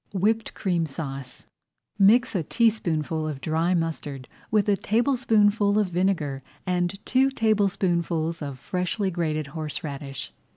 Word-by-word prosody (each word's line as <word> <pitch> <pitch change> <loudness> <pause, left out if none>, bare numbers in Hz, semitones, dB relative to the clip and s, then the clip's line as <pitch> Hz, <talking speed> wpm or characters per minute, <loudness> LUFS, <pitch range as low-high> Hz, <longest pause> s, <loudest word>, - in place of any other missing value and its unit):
WHIPPED 215 +4 0
CREAM 175 -5 0
SAUCE 135 -3 -6 0.5
Mix 230 +5 +5
a 185 - +1
teaspoonful 165 - 0
of 150 -3 -4
dry 165 +5 +1
mustard 150 -5 -3 0.2
with 215 -2 +2
a 205 - +4
tablespoonful 215 -3 +2
of 210 -3 +2
vinegar 175 -7 0 0.2
and 180 0 0
two 265 +1 +3
tablespoonfuls 185 - +1
of 140 -3 -5
freshly 180 - -2
grated 155 -3 -1
horseradish. 145 -4 -5
175 Hz, 120 wpm, -25 LUFS, 155-205 Hz, 0.5 s, Mix